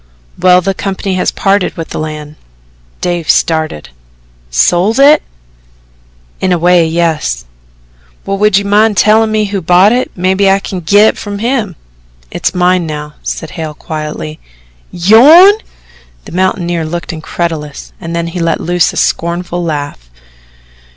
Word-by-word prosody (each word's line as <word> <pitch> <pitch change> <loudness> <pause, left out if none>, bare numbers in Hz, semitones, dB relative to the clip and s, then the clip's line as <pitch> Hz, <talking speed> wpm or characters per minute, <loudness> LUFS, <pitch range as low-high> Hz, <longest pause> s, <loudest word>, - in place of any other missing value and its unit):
"Well, 180 0 +4
the 195 +2 -1
company 195 0 -4
has - - +1
parted 195 -2 0
with 165 - -6
the - - -5
land." 155 -1 -6 0.7
Dave 175 -2 -2
started. 160 - 0 0.6
"Sold 175 - +2
it?" 290 +2 +6 1.2
"In 185 - 0
a 180 - +3
way 175 0 +3
yes." 160 - -1 0.8
"Well, 195 0 -3
would 210 -1 +3
you 200 - -1
mind 210 +1 +2
tellin' 215 +3 +3
me 215 -1 +1
who 200 -1 -3
bought 180 +5 +4
it 250 +2 0
maybe 190 +2 +1
I 195 - +4
can 195 -1 -6
git 205 +5 +4
it - - -4
from 205 -1 -6
him." 225 -4 -2 0.6
"It's - - -2
mine 180 -1 +1
now," 150 -1 -6
said 160 - -5
Hale 160 -3 -6
quietly. 150 - -6 0.5
"YOURN!" 275 - +6 0.7
The - - -11
mountaineer 175 -2 -1
looked 170 +2 -5
incredulous 160 -2 -5
and 165 0 -5
then 170 0 -2
he 170 +2 -5
let 165 -1 0
loose 175 -1 +1
a - - -7
scornful 175 +1 -1
laugh. 145 - -5
175 Hz, 145 wpm, -12 LUFS, 160-200 Hz, 1.2 s, it